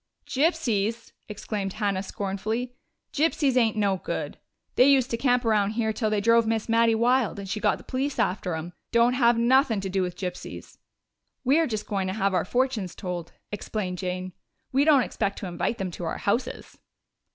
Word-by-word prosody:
"Gypsies!" 240 - 0 0.2
exclaimed 205 -2 -4
Hannah 200 -3 -1
scornfully. 210 +5 -3 0.4
"Gypsies 290 -3 +2
ain't 225 -3 +3
no 200 -2 +2
good! - - -5 0.3
They 255 +3 +5
used 270 -2 +3
to - - +1
camp 245 0 +2
around 210 -2 +2
here 220 -2 +1
till 220 0 -1
they 215 -1 +1
drove 230 +1 +4
Miss 225 -1 -1
Mattie 230 0 +4
wild 240 -1 +2
and 200 -1 -6
she 210 +3 -3
got - - +2
the - - -14
police 270 +2 -2
after 180 -2 0
'em. 165 +2 -6 0.2
Don't 235 +1 +4
have 240 -2 +4
nuthin' 240 -1 +3
to 195 - -4
do 190 0 +1
with 180 -1 -3
gypsies!" 180 -2 -7 0.6
"We're 300 +5 +3
just 215 -4 -3
going 195 -2 -2
to 185 - -2
have 195 -2 +1
our 180 - +1
fortunes 240 -5 -1
told," 175 -3 -5 0.2
explained 200 -3 -4
Jane. 185 0 -4 0.4
"We 275 +2 +3
don't 290 -5 +6
expect 200 -3 -2
to 195 - -5
invite 175 +6 -2
them 190 -2 -3
to 175 - -6
our - - -3
houses." 230 +5 -2
220 Hz, 185 wpm, -26 LUFS, 195-245 Hz, 0.6 s, don't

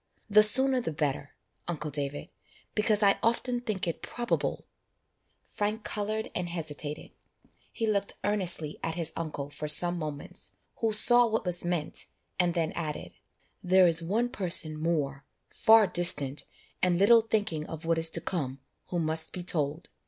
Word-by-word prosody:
The 215 +1 +8
sooner 260 +4 +4
the 165 - -3
better, 145 -2 -3 0.3
uncle 155 -3 -4
David, 145 0 -2 0.4
because 210 0 +2
I 200 -1 +4
often 240 +1 0
think 210 -7 -3
it 170 - -4
probable 240 0 -3 0.4
" - - -47
Frank 210 +1 -1
coloured 215 +1 -3
and 180 -1 -3
hesitated; 155 -3 -5 0.6
he 225 - -3
looked 200 -2 0
earnestly 180 -7 -1
at 165 0 -3
his 165 -2 -3
uncle 150 -3 -5
for 150 +1 -5
some 175 +3 +3
moments, 150 -3 -4 0.2
who 225 -1 0
saw 240 +3 +5
what 220 -2 -2
was 175 -1 0
meant, 175 -3 -1 0.3
and 175 -1 +2
then 165 -2 0
added, 155 -3 -5 0.5
"There 185 +1 +5
is 165 -1 +5
one 215 +9 -1
person 175 -8 +2
more, 150 -4 -2 0.3
far 220 -1 +5
distant, 160 -6 +3 0.4
and 180 -1 +2
little 225 +5 +6
thinking 205 -9 -2
of 160 0 -8
what 165 0 +1
is 165 0 +2
to 165 - -1
come, 140 -8 -3 0.3
who 175 - -3
must 160 -1 -2
be 180 - -6
told. 155 -2 -2
175 Hz, 160 wpm, -28 LUFS, 155-210 Hz, 0.6 s, The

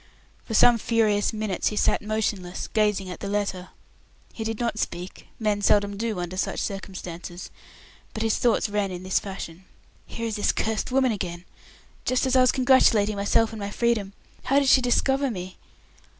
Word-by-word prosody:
For 225 - -3
some 235 +1 +6
furious 215 -3 +2
minutes 215 -4 -2
he 210 - -1
sat - - +2
motionless, 210 -4 -2
gazing 210 -3 0
at - - -8
the - - -5
letter. 200 -3 -2 0.6
He 225 - -5
did 225 -1 -3
not 235 -2 -1
speak 180 -1 -5
men 210 -2 0
seldom 205 0 +3
do 220 -2 -2
under 175 +1 -5
such - - -1
circumstances 180 -3 -6 0.6
but 220 - -4
his 225 -1 +1
thoughts 235 -2 +2
ran 205 -1 -1
in 180 -1 -7
this 185 0 +1
fashion: 190 -3 -8 0.4
"Here 230 - -5
is 225 -1 -2
this 205 - +1
cursed 220 +2 -2
woman 260 -1 +3
again! 180 -4 -5 0.6
Just 255 +1 +1
as 260 0 +1
I 255 - +6
was 255 - +5
congratulating 245 -5 +4
myself 210 +3 +2
on 220 - -7
my 200 0 -4
freedom. 215 -3 0 0.3
How 270 +2 +2
did 280 -2 +3
she 265 - +6
discover 270 +2 +2
me? 185 -4 -7
210 Hz, 180 wpm, -25 LUFS, 190-230 Hz, 0.6 s, some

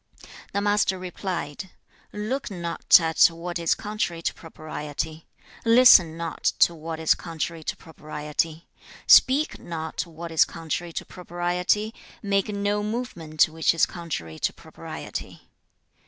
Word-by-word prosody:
The 200 - -1
Master 205 -2 +2
replied, 180 -2 -5 0.4
'Look 220 +7 -3
not 170 -3 +4
at 160 -1 +2
what 175 +1 -5
is 165 -1 +2
contrary 205 -5 -3
to - - 0
propriety; 155 0 -6 0.4
listen 230 -9 +7
not 165 -1 -5
to 170 - +5
what 160 0 -6
is 160 - +4
contrary 165 -1 -5
to - - -3
propriety; 155 +1 -4 0.4
speak 275 +4 +5
not 160 0 -5
what 165 0 -8
is 160 - +5
contrary 165 +2 -5
to - - -4
propriety; 180 +5 -1 0.3
make 200 -1 +1
no 205 0 -1
movement 205 -9 -1
which 160 +1 +1
is 165 - +4
contrary 110 - -6
to - - 0
propriety.' - - -9
170 Hz, 125 wpm, -25 LUFS, 160-200 Hz, 0.4 s, listen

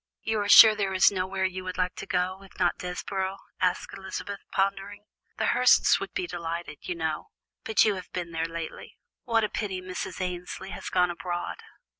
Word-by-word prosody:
"You 220 -1 0
are 205 0 -1
sure 220 0 +11
there 200 -2 -1
is 185 - +6
nowhere 190 0 -1
you 185 0 -3
would 185 0 -5
like 180 0 0
to 195 - -7
go, 185 +1 -1
if 195 - -16
not 175 - +1
Desborough?" 190 +2 -3 0.2
asked 185 +1 0
Elizabeth, 195 +1 -6
pondering. 195 +1 -1 0.3
"The - - 0
Hursts - - +5
would - - -5
be 360 - -2
delighted, 170 - -5
I - - +1
know, 160 -2 -3 0.4
but 220 - +4
you 215 - +3
have 185 -2 -8
been 175 -2 -4
there 165 0 -1
lately; 165 -1 -7 0.3
what 230 -2 +2
a - - +2
pity 195 -4 -3
Mrs. 185 0 -6
Annesley 180 +1 -5
has - - -6
gone 180 -1 +2
abroad." 175 0 -4
185 Hz, 190 wpm, -27 LUFS, 180-195 Hz, 0.4 s, sure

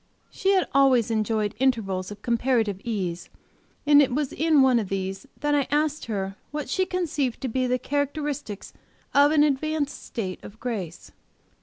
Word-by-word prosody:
She 390 +1 +1
had 375 - +2
always 260 -5 +4
enjoyed 215 -1 0
intervals 200 -8 0
of 205 0 -10
comparative 235 -5 +1
ease, 185 -7 -3 0.6
and 290 0 +7
it 270 - +2
was 285 +1 -1
in 310 -3 +4
one 255 -2 +4
of 205 -4 -4
these 195 0 -4
that 295 0 +1
I 285 -2 +2
asked 300 +1 0
her 195 -3 -3
what 300 0 -4
she 375 -1 +1
conceived 310 -9 -1
to 265 - -2
be 255 +2 0
the 250 0 +1
characteristics 285 -5 -3 0.4
of 285 +1 +6
an 300 -1 +5
advanced 295 0 -1
state 190 -6 -5
of 210 +2 -12
grace. 200 -9 -5
255 Hz, 165 wpm, -25 LUFS, 210-290 Hz, 0.6 s, and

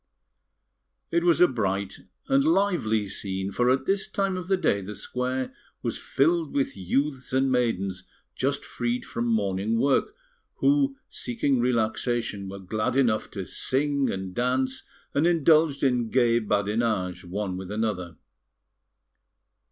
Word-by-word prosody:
It 170 0 +2
was 175 -2 +4
a 180 - +8
bright 100 - -2 0.3
and 275 0 +4
lively 180 - +2
scene, 95 -1 -3
for 125 +4 +2
at 130 +1 +2
this 195 0 0
time 195 -2 -1
of 180 -1 -5
the 190 0 +2
day 100 - +1
the 105 +2 -7
square 130 +1 -3 0.3
was - - -2
filled 160 +2 +1
with 140 -1 0
youths 130 +8 -1
and 130 0 +2
maidens 100 -7 0 0.3
just 140 +1 -1
freed 120 0 -2
from 120 +1 -3
morning 105 0 0
work, 140 - +2 0.4
who, 280 -1 +2
seeking 145 - -1
relaxation, 115 -3 0
were 100 - -7
glad 105 +5 -2
enough 120 -5 +2
to 95 -3 -5
sing 140 +4 0
and 95 -1 -4
dance, 130 +2 0 0.3
and 150 +4 +3
indulged 155 -3 +4
in 125 -4 +2
gay 120 -2 +3
badinage 105 -3 0
one 95 +1 -3
with 95 0 -6
another. 105 -5 -2
120 Hz, 135 wpm, -26 LUFS, 100-140 Hz, 0.4 s, a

